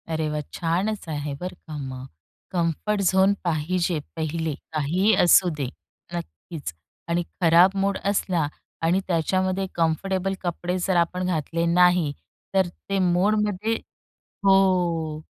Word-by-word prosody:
अरे 160 Hz, -1 st, -1 dB
वा! 150 Hz, 0 st, -2 dB
छानच 180 Hz, +5 st, -1 dB
आहे 145 Hz, -1 st, -3 dB
बरं 180 Hz, +1 st, -5 dB
का 155 Hz, -2 st, -6 dB
मग. 130 Hz, -2 st, -6 dB, 0.4 s
कम्फर्ट 180 Hz, +4 st, 0 dB
झोन 190 Hz, +1 st, +4 dB
पाहिजे 170 Hz, 0 st, 0 dB, 0.2 s
पहिले, 160 Hz, 0 st, -2 dB, 0.2 s
काहीही 165 Hz, +8 st, +2 dB
असू 180 Hz, +1 st, +6 dB
दे. 140 Hz, -3 st, -2 dB, 0.5 s
नक्कीच 155 Hz, -, -6 dB, 0.4 s
आणि 170 Hz, +1 st, +1 dB, 0.2 s
खराब 175 Hz, +3 st, +6 dB
मूड 200 Hz, 0 st, +1 dB
असला 185 Hz, -5 st, +1 dB, 0.3 s
आणि 170 Hz, +3 st, +3 dB
त्याच्यामध्ये 185 Hz, +2 st, 0 dB
कम्फर्टेबल 185 Hz, +4 st, 0 dB
कपडे 175 Hz, 0 st, -2 dB
जर 190 Hz, -, +2 dB
आपण 180 Hz, +2 st, +1 dB
घातले 170 Hz, -1 st, -1 dB
नाही 175 Hz, -2 st, +4 dB, 0.4 s
तर 190 Hz, -2 st, +3 dB
ते 195 Hz, +3 st, -4 dB
मूडमध्ये, 205 Hz, +4 st, +1 dB, 0.7 s
हो. 175 Hz, -5 st, +3 dB
175 Hz, 120 wpm, -24 LUFS, 160-190 Hz, 0.7 s, असू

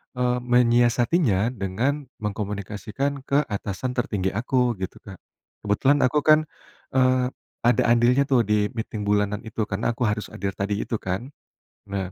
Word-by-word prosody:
eee, 125 Hz, 0 st, +1 dB
menyiasatinya 120 Hz, -, +3 dB
dengan 125 Hz, +7 st, -2 dB, 0.2 s
mengkomunikasikan 105 Hz, +6 st, -3 dB
ke 140 Hz, +2 st, +3 dB
atasan 100 Hz, +4 st, -3 dB
tertinggi 105 Hz, -6 st, -1 dB
aku 125 Hz, +2 st, +1 dB
gitu, 95 Hz, 0 st, -4 dB
Kak. 95 Hz, -3 st, -11 dB, 0.4 s
Kebetulan 130 Hz, +8 st, +2 dB
aku 150 Hz, +3 st, +1 dB
kan, 155 Hz, 0 st, +5 dB, 0.5 s
eee, 130 Hz, -1 st, +3 dB, 0.4 s
ada 120 Hz, -, +4 dB
andilnya 120 Hz, +3 st, +4 dB
tuh 130 Hz, -6 st, +2 dB
di 105 Hz, -1 st, +1 dB
meeting 110 Hz, -2 st, -5 dB
bulanan 105 Hz, 0 st, +1 dB
itu. 110 Hz, 0 st, -3 dB
Karena 105 Hz, +4 st, -1 dB
aku 120 Hz, +2 st, -3 dB
harus 105 Hz, -1 st, -2 dB
hadir 100 Hz, +1 st, -3 dB
tadi 100 Hz, +1 st, -2 dB
itu -, -, -3 dB
kan. 95 Hz, +7 st, -3 dB, 0.6 s
Nah, 95 Hz, -2 st, -3 dB
115 Hz, 145 wpm, -24 LUFS, 100-125 Hz, 0.6 s, kan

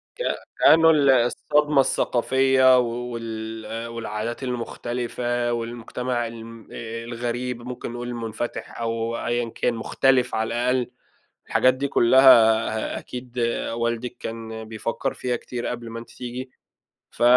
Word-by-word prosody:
ك -, -, -4 dB, 0.4 s
كأنه 160 Hz, +1 st, +7 dB
ال 145 Hz, -4 st, +4 dB
الصدمة 135 Hz, +4 st, +3 dB
الثقافية 130 Hz, +1 st, +3 dB
و -, -, +3 dB
وال 115 Hz, -1 st, -5 dB
والعادات 115 Hz, +1 st, -4 dB
المختلفة 120 Hz, 0 st, -2 dB
والمجتمع 120 Hz, +1 st, -3 dB
الم 115 Hz, -1 st, -10 dB
آآ، 115 Hz, 0 st, -6 dB
الغريب، 120 Hz, +1 st, -3 dB
ممكن 125 Hz, 0 st, -6 dB
نقول 120 Hz, 0 st, -5 dB
المُنفتح 120 Hz, -1 st, -5 dB
أو 115 Hz, 0 st, -2 dB
أيًا 120 Hz, -1 st, 0 dB
كان، 120 Hz, -, -1 dB
مختلف 125 Hz, +2 st, +2 dB
على 110 Hz, 0 st, 0 dB
الأقل، 125 Hz, +1 st, 0 dB, 0.6 s
الحاجات 130 Hz, -, +4 dB
دي 140 Hz, +2 st, -2 dB
كلها 115 Hz, -4 st, +5 dB
أكيد 125 Hz, 0 st, -7 dB, 0.3 s
والدِك 115 Hz, +1 st, -2 dB
كان 110 Hz, -1 st, -6 dB
بيفكر 110 Hz, +1 st, -3 dB
فيها 125 Hz, -1 st, -2 dB
كتير 120 Hz, 0 st, -5 dB
قبل 120 Hz, -1 st, -5 dB
ما 115 Hz, 0 st, -6 dB
أنتِ 115 Hz, -, -12 dB
تيجي، 125 Hz, +1 st, -7 dB, 0.6 s
ف -, -, -7 dB
120 Hz, 125 wpm, -24 LUFS, 115-125 Hz, 0.6 s, كأنه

